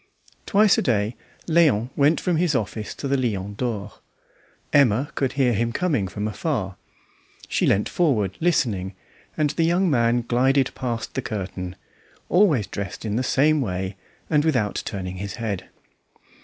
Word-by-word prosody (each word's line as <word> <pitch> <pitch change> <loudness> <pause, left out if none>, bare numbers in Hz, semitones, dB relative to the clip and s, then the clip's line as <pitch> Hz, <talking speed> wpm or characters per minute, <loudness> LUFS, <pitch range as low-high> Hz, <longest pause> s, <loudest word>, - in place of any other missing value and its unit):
Twice 210 0 +4
a - - +1
day 110 -2 0 0.3
Léon 150 -9 +3
went 145 +3 +3
from 175 -3 0
his 165 -3 +1
office 110 -2 -3
to 140 - -4
the 140 - +1
Lion 105 -6 -2
d'Or. 105 -3 -3 0.8
Emma 135 -1 +4
could 135 -2 -1
hear 130 -3 +2
him 115 +2 0
coming 140 - 0
from 105 +3 -4
afar; 105 - -2 0.7
she - - +1
leant 100 - +2
forward 110 - +1
listening, 110 - 0 0.4
and 150 -2 +2
the 160 +2 0
young 175 +2 +2
man 120 -2 +2
glided 130 +3 +2
past 120 -3 -4
the 130 - -2
curtain, 95 -5 -5 0.5
always 170 - +4
dressed 100 +1 -6
in 105 -1 -1
the 125 - +1
same 145 +4 +3
way, 95 -3 -3 0.3
and 150 -2 +2
without 125 -10 0
turning 95 -3 -5
his 100 +1 -5
head. 105 -6 -4
120 Hz, 155 wpm, -23 LUFS, 105-145 Hz, 0.8 s, Twice